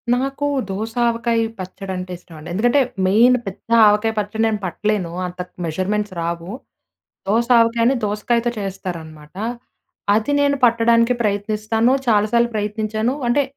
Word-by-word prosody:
నాకు 275 Hz, +3 st, -2 dB, 0.2 s
దోస 215 Hz, +4 st, -4 dB
ఆవకాయ 230 Hz, 0 st, 0 dB, 0.2 s
పచ్చడి 190 Hz, +1 st, -7 dB
అంటే 180 Hz, 0 st, -6 dB
ఇష్టం 170 Hz, -1 st, -16 dB
అండి. 155 Hz, +3 st, -10 dB
ఎందుకంటే 240 Hz, +8 st, +3 dB, 0.3 s
మెయిన్ 235 Hz, +6 st, +5 dB
పెద్ద 195 Hz, +3 st, -8 dB, 0.2 s
ఆవకాయ 210 Hz, +2 st, +3 dB
పచ్చడి 210 Hz, +2 st, -3 dB
నేను 215 Hz, -2 st, -1 dB
పట్టలేను. 185 Hz, 0 st, -1 dB, 0.2 s
అంత 180 Hz, 0 st, -11 dB, 0.3 s
మెజర్మెంట్స్ 190 Hz, +5 st, -2 dB
రావు. 170 Hz, +2 st, -4 dB, 0.8 s
దోస 230 Hz, +4 st, +2 dB
ఆవకాయని 230 Hz, +2 st, +3 dB
దోసకాయతో 230 Hz, +3 st, 0 dB
చేస్తారనమాట. 165 Hz, -6 st, -7 dB, 0.8 s
అది 220 Hz, +7 st, +1 dB
నేను 285 Hz, 0 st, +2 dB
పట్టడానికి 230 Hz, 0 st, +4 dB
ప్రయత్నిస్తాను. 215 Hz, +3 st, 0 dB
చాలాసార్లు 235 Hz, +2 st, +3 dB
ప్రయత్నించాను. 215 Hz, +3 st, -1 dB
అంటే 275 Hz, +4 st, +3 dB
215 Hz, 125 wpm, -20 LUFS, 190-235 Hz, 0.8 s, మెయిన్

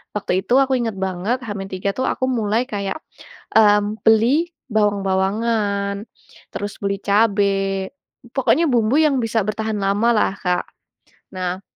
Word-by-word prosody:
Waktu 210 Hz, -, -3 dB
itu -, -, 0 dB
aku 265 Hz, 0 st, -1 dB
ingat 225 Hz, -3 st, -2 dB
banget 190 Hz, +7 st, -1 dB
H-3 195 Hz, -2 st, -4 dB
itu 260 Hz, -, -2 dB
aku 260 Hz, -, -1 dB
mulai 225 Hz, -1 st, 0 dB
kayak, 200 Hz, +2 st, -3 dB, 0.6 s
mmm, 210 Hz, 0 st, +4 dB
beli 255 Hz, +11 st, +3 dB, 0.2 s
bawang-bawangan, 200 Hz, 0 st, 0 dB, 0.5 s
terus 205 Hz, 0 st, -5 dB
beli 200 Hz, 0 st, -1 dB
cabe, 205 Hz, 0 st, +3 dB, 0.9 s
pokoknya 270 Hz, +5 st, +3 dB
bumbu 235 Hz, +1 st, +2 dB
yang 295 Hz, -4 st, +3 dB
bisa 225 Hz, 0 st, 0 dB
bertahan 220 Hz, 0 st, -2 dB
lamalah, 210 Hz, +2 st, +2 dB
Kak. 180 Hz, -1 st, 0 dB, 0.7 s
Nah 185 Hz, +1 st, -3 dB
210 Hz, 125 wpm, -20 LUFS, 200-230 Hz, 0.9 s, mmm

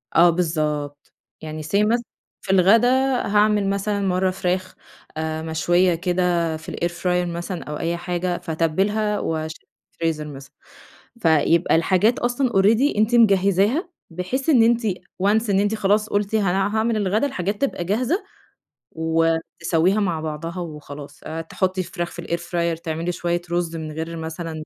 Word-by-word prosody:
آه 175 Hz, +1 st, +7 dB
بالضبط 150 Hz, -4 st, -2 dB, 0.3 s
يعني 155 Hz, 0 st, -6 dB
Say 155 Hz, -, -8 dB, 0.2 s
مثلًا 235 Hz, +2 st, +1 dB, 0.4 s
في -, -, -3 dB
الغدا 195 Hz, +6 st, +5 dB, 0.4 s
هاعمل 210 Hz, -1 st, +3 dB
مثلًا 200 Hz, +1 st, -1 dB
مرة 185 Hz, -1 st, +1 dB
فراخ 185 Hz, 0 st, -2 dB, 0.4 s
آآ 160 Hz, 0 st, -2 dB
مشوية 175 Hz, +3 st, +2 dB
كده 175 Hz, -2 st, 0 dB
في 155 Hz, -, -9 dB
الair 170 Hz, -, -1 dB
fryer 180 Hz, -1 st, +1 dB
مثلًا 175 Hz, +1 st, -5 dB
أو 150 Hz, 0 st, -6 dB
أي 170 Hz, +1 st, -1 dB
حاجة 175 Hz, 0 st, -2 dB
فاتبلها 195 Hz, +7 st, 0 dB
وأشيلها 160 Hz, 0 st, -4 dB, 0.2 s
في -, -, -47 dB
الفريزر 160 Hz, -2 st, -2 dB
مثلًا، 140 Hz, -1 st, -11 dB, 0.7 s
فيبقى 165 Hz, -1 st, +3 dB
الحاجات 185 Hz, +8 st, +2 dB
أصلًا 245 Hz, +1 st, 0 dB
already 220 Hz, +6 st, +3 dB
أنتِ 215 Hz, +3 st, +3 dB
مجهزاها 200 Hz, -, +3 dB, 0.2 s
بحيث 185 Hz, -, -3 dB
إن 250 Hz, -7 st, +6 dB
أنتِ، 230 Hz, -1 st, +2 dB, 0.4 s
once 215 Hz, +2 st, +2 dB
إن 195 Hz, -, +3 dB
أنتِ 205 Hz, +2 st, +1 dB
خلاص 210 Hz, +1 st, +1 dB
قُلتِ 205 Hz, +1 st, 0 dB
هان 195 Hz, -4 st, +2 dB, 0.2 s
هاعمل 220 Hz, +1 st, +1 dB
الغدا 210 Hz, +6 st, +1 dB
الحاجات 200 Hz, -4 st, -3 dB
تبقى 275 Hz, -10 st, -1 dB
جاهزة 250 Hz, -, 0 dB, 0.7 s
وتسويها 165 Hz, +3 st, +1 dB
مع 175 Hz, -6 st, 0 dB
بعضها 160 Hz, +3 st, -5 dB
وخلاص، 145 Hz, -3 st, -8 dB
آآ 160 Hz, +1 st, -5 dB
تحطي 185 Hz, +3 st, -1 dB
الفراخ 175 Hz, -1 st, -4 dB
في 175 Hz, -, -7 dB
الair 170 Hz, -, -1 dB
fryer 170 Hz, -1 st, -2 dB
تعملي 165 Hz, +1 st, -2 dB
شوية 175 Hz, 0 st, -1 dB
رز 175 Hz, -1 st, -1 dB
من 155 Hz, -1 st, -5 dB
غير 165 Hz, +2 st, -5 dB
مثلًا 160 Hz, +1 st, -5 dB
180 Hz, 150 wpm, -22 LUFS, 165-205 Hz, 0.7 s, آه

